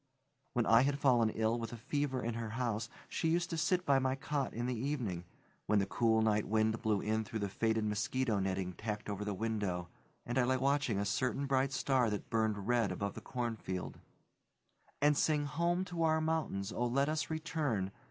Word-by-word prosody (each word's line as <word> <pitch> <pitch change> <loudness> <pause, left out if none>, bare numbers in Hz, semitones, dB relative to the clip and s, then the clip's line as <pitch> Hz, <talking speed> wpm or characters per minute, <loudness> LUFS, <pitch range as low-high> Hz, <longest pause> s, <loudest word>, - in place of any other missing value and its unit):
When 120 -4 +1
I 115 +1 +6
had 140 +1 +1
fallen 125 -5 +4
ill 110 +2 0
with 115 0 -4
a 120 - -6
fever 135 +1 -1
in 115 +1 -1
her 115 -1 -4
house 115 -2 -1 0.2
she 165 - -1
used 170 +1 +1
to - - -1
sit 180 +3 +1
by 140 -1 +4
my 130 0 +1
cot 140 0 -2
in 120 +1 -3
the 125 - 0
evening 115 -9 -2 0.4
when 105 - +3
the 100 - +3
cool, 110 +2 +2
night 105 -1 +2
wind 110 +1 +1
blew 110 -4 +1
in 110 +1 0
through 110 +1 -5
the 100 -2 -2
faded 110 +2 0
mosquito 105 +2 0
netting 95 -1 -1
tacked 105 +1 -4
over 100 0 -3
the 105 -1 -2
window, 100 -5 -2 0.4
and 120 +2 0
I - - +4
lay 130 +1 +2
watching 140 -4 +1
a 100 - 0
certain 125 +6 0
bright 135 0 +2
star 130 -4 +2
that 105 -1 -4
burned 110 -3 0
red 120 -4 +2
above 100 -1 -3
the - - -8
cornfield 115 -7 -4 1.0
and 150 0 +5
sing 150 0 +2
"Home 170 +5 0
to 175 -3 -4
our 160 -1 +3
mountains, 155 -12 -1
O, 120 - 0
let 135 +4 +2
us 155 0 -1
return!" 150 -11 -1
120 Hz, 200 wpm, -34 LUFS, 105-140 Hz, 1.0 s, I